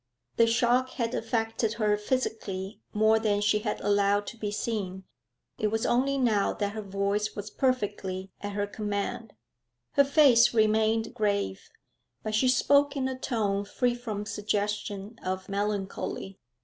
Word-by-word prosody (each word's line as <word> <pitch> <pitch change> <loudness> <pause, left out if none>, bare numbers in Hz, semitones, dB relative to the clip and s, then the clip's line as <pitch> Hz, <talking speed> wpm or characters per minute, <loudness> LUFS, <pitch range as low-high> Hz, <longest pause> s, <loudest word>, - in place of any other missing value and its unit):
The 230 - +5
shock 245 +3 +2
had 235 -1 -2
affected 225 -1 -1
her 215 -2 +2
physically 210 -4 -3
more 220 +1 +4
than 210 -2 +1
she 210 +1 +2
had 210 0 -3
allowed 205 0 +2
to 235 - -7
be 215 -2 -3
seen; 205 -3 -3 0.6
it 215 - +2
was 225 +1 -1
only 270 +3 +2
now 220 -6 +2
that 205 -1 -2
her 215 +1 -5
voice 200 +1 -1
was 205 0 -6
perfectly 205 -7 -1
at 205 0 -4
her 205 0 0
command. 210 +2 -4 0.6
Her 280 - +5
face 275 -5 +5
remained 220 +1 +2
grave, 200 - -1 0.5
but 215 - -3
she 220 +4 +3
spoke 280 +3 +3
in 260 -1 0
a 260 - -3
tone 210 -6 -1
free 245 +4 0
from 220 -4 -5
suggestion 210 0 -3
of 185 0 -3
melancholy. 200 -1 -3
215 Hz, 150 wpm, -28 LUFS, 205-230 Hz, 0.6 s, The